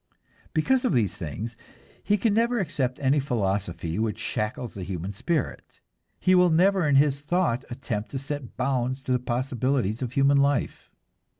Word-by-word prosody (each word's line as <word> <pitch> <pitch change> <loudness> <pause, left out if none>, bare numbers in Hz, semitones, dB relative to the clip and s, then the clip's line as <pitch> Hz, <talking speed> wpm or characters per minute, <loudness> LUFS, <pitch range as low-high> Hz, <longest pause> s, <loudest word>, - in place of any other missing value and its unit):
Because 250 +12 +2
of 255 - +1
these 110 -6 +2
things 105 +9 -5 0.5
he 205 +1 +2
can 210 +1 +1
never 235 +2 +2
accept 135 -8 -1
any 140 +1 +3
philosophy 100 - -2
which 110 -1 -1
shackles 110 +1 -3
the 100 - -7
human 95 +1 -4
spirit, 160 - -3 0.4
he 185 - +3
will 180 -1 +6
never 180 +1 +3
in 145 - +3
his 140 0 +4
thought 150 -5 0
attempt 120 -4 -4
to 135 - -4
set 140 -1 -6
bounds 130 0 -1
to 130 - -3
the 125 - +3
possibilities 125 -2 -1
of 125 -1 -3
human 140 +1 +4
life. 140 -2 0
130 Hz, 165 wpm, -26 LUFS, 115-150 Hz, 0.5 s, will